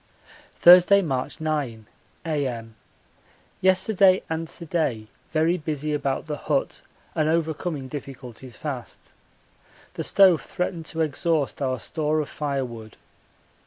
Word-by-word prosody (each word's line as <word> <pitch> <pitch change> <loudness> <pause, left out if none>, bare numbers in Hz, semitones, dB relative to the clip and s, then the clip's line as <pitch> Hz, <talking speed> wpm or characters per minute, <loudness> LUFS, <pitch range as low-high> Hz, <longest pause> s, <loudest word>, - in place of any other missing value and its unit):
Thursday, 180 +3 +7
March 135 -6 -3
9, 145 -8 -2 0.4
A.M. 130 -8 -2 0.9
Yesterday 190 0 +4
and 160 0 -2
to 170 - -10
day 150 -10 -1 0.3
very 165 +3 +2
busy 150 -1 -3
about 140 -2 -1
the 150 -2 -4
hut - - -1 0.3
and 155 -1 +1
overcoming 160 -3 -1
difficulties 130 -3 -9
fast. 135 -6 -7 0.8
The - - -4
stove 190 -5 +5
threatened 175 -3 -4
to 165 - -2
exhaust 155 -1 0
our 130 -2 -1
store 155 +4 -1
of 150 - -3
firewood. 125 -7 -4
155 Hz, 115 wpm, -24 LUFS, 135-165 Hz, 0.9 s, Thursday